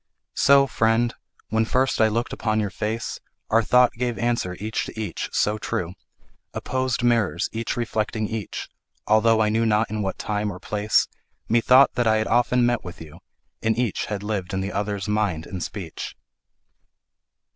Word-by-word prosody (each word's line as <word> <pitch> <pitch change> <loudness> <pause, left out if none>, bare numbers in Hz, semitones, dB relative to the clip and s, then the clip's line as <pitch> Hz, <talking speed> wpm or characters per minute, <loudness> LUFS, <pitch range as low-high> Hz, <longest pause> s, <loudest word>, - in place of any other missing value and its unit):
So, 140 0 +5
friend, 115 -2 +1 0.4
when 110 0 +2
first 130 +2 +1
I 110 - +6
look'd 115 +2 -2
upon 110 -1 0
your 105 -2 -1
face, 110 +4 -3 0.3
Our 115 +1 +5
thought 125 +2 +4
gave 120 -1 -2
answer 110 -5 -1
each 110 +2 -2
to - - -8
each, 105 -7 -4
so 105 +1 +1
true— 90 -3 -3 0.6
Opposed 130 -1 -1
mirrors 105 -8 +2
each 115 +1 -3
reflecting 110 -2 -1
each— 110 -3 -5 0.4
Altho' 110 +1 +4
I 105 - +3
knew 110 +2 +1
not 110 -1 +2
in 110 0 -2
what 95 -2 -2
time 105 0 -2
or 90 - -8
place, 105 +2 +1 0.4
Methought 125 +4 +5
that 120 -2 +1
I 110 - +4
had 110 - 0
often 120 +1 +3
met 120 -1 +1
with 90 - -9
you, 80 0 -11 0.4
And 110 0 +1
each 120 -5 -1
had 100 -1 -4
lived 100 -3 -3
in 95 - -1
the 100 +1 -3
other's 100 -1 -2
mind 105 -7 0
and 95 -2 -6
speech. 85 -1 -6
110 Hz, 170 wpm, -24 LUFS, 105-115 Hz, 0.6 s, I